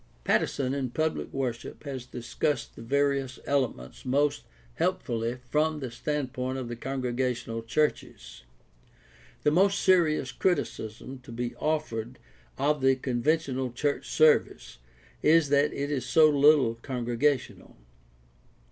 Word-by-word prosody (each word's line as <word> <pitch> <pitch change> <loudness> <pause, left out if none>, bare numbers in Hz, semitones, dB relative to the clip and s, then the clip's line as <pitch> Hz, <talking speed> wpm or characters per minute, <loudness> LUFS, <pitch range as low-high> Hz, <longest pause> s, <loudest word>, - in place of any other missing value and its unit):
Pattison 130 - +1
in 135 -2 -2
Public 155 +5 -2
Worship 125 -3 -4
has 130 -4 -6
discussed 125 +5 -3
the - - -10
various 140 +1 0
elements 130 - -2
most 140 +3 +1 0.3
helpfully 115 - -1
from 155 +2 +1
the 130 -4 -5
standpoint 130 -1 -3
of 125 -2 -5
the 120 - -4
congregational 125 -2 -2
churches. 115 - -2 1.0
The 150 - +4
most 195 +5 +3
serious 160 -8 +3
criticism 130 - -2
to 125 - -13
be 120 +1 -4
offered 130 -6 -2 0.4
of 145 +1 +1
the 135 0 +4
conven 125 -2 -3
tional 130 -4 0
church 145 +3 -1
service 155 - +2 0.4
is 160 -1 +4
that 145 +1 +3
it 140 +1 -3
is 135 -3 -1
so 160 -1 +5
little 145 -4 +5
congregational. 125 - -2
135 Hz, 120 wpm, -28 LUFS, 120-150 Hz, 1.0 s, so